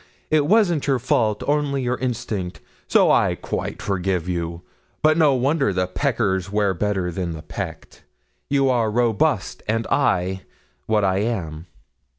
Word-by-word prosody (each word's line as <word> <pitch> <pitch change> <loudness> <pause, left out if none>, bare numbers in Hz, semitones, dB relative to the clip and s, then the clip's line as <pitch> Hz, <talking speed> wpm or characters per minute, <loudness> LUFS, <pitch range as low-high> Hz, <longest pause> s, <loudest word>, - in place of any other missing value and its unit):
It 150 -2 +3
wasn't 175 -7 +3
your 135 -2 +3
fault, 110 -3 0
only 145 -2 +1
your 125 +1 -1
instinct, 110 -7 -3 0.3
so - - +4
I - - +3
quite - - -5
forgive 95 -3 -1
you; 85 -1 -3 0.4
but 155 0 +5
no 155 -4 +4
wonder 135 -2 +1
the 90 -1 0
peckers 95 -3 -1
wear 105 -2 +1
better 95 -1 -1
than 85 -1 -3
the 80 -1 -8
pecked. - - -7 0.5
You 140 -1 +2
are 115 -3 +1
robust; 115 -1 +1
and 115 +1 0
I, 95 -8 +1 0.5
what 105 -2 +2
I 95 0 +1
am." 90 -7 -3
105 Hz, 150 wpm, -22 LUFS, 95-135 Hz, 0.5 s, but